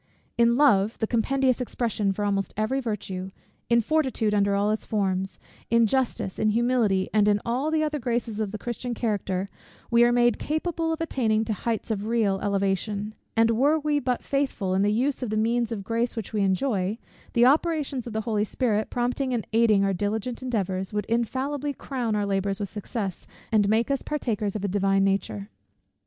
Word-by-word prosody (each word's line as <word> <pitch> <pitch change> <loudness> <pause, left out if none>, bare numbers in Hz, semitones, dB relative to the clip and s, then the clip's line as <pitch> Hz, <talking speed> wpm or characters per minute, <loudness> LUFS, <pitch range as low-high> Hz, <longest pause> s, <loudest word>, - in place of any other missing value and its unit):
In 235 0 +4
love, 225 -7 +4
the 220 - 0
compendious 255 +3 +1
expression 225 -4 -1
for 205 +2 -2
almost 200 -1 -1
every 220 +5 0
virtue, 195 -6 -4 0.4
in 235 0 +5
fortitude 260 -6 +1
under 200 -1 +2
all 205 +1 +2
its 215 - -2
forms, 190 -2 -1 0.3
in 230 0 +4
justice, 240 -5 -1
in 215 - +3
humility, 225 -4 +2
and 210 -1 +4
in 205 0 +3
all 255 +6 0
the 315 0 +1
other 300 -1 -1
graces 235 -3 -2
of 215 -2 -1
the 215 - -5
Christian 240 +2 -4
character, 200 -4 -1 0.4
we 235 0 +6
are 240 - +5
made 240 -2 +3
capable 325 +1 -1
of 320 - -3
attaining 225 -8 +1
to 220 - -1
heights 225 +2 -3
of 210 0 -2
real 220 -4 +1
elevation: 200 +1 -1 0.2
and 225 0 +5
were 280 +7 +3
we 300 -1 0
but 250 -2 -1
faithful 270 -9 -1
in 190 - +2
the 205 +1 +3
use 255 +6 0
of 250 - -2
the 215 - -1
means 235 +2 +1
of 210 -3 -3
grace 230 +3 -1
which 225 -1 -5
we 210 - +1
enjoy; 195 0 0 0.4
the 240 0 +5
operations 285 -3 +1
of 235 - -6
the 220 - -1
Holy 215 -1 0
Spirit, 220 -1 0
prompting 250 +1 -1
and 225 - -2
aiding 220 -3 +4
our 195 0 +1
diligent 215 +6 -2
endeavours, 195 -7 -2
would 210 -1 -2
infallibly 265 +5 -1
crown 245 -5 -3
our 205 -1 0
labours 195 0 -1
with 200 -2 -3
success, 205 -3 -5 0.2
and 205 -2 +3
make 225 +4 +2
us 275 - 0
partakers 220 -9 -2
of 210 - -3
a - - +1
Divine 195 0 +2
nature. 110 - -1
220 Hz, 190 wpm, -26 LUFS, 200-250 Hz, 0.4 s, we